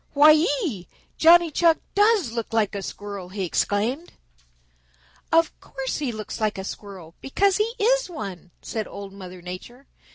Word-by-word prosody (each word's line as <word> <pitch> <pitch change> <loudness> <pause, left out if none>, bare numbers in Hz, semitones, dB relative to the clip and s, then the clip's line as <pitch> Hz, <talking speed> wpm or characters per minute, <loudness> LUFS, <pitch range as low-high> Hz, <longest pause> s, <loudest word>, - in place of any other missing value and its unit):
Why 300 +1 +8 0.3
ee! 200 - -4 0.3
Johnny 340 0 +7
Chuck 330 +1 +4 0.2
does 410 - +3
look 230 -1 -4
like 215 -3 +1
a 200 - -3
Squirrel," 200 -2 -7
he 195 0 -3
exclaimed. 220 - -1 1.2
"Of 330 -1 +4
course 270 -1 -4
he 285 -5 -2
looks 215 0 -7
like 215 -2 0
a 190 - -4
Squirrel, 190 -5 -9
because 385 +8 +2
he 445 +3 0
is - - +2
one," 195 - -7
said 220 -2 -4
Old 200 -1 -9
Mother 185 -2 -10
Nature. 210 +9 -9
230 Hz, 155 wpm, -24 LUFS, 195-330 Hz, 1.2 s, Why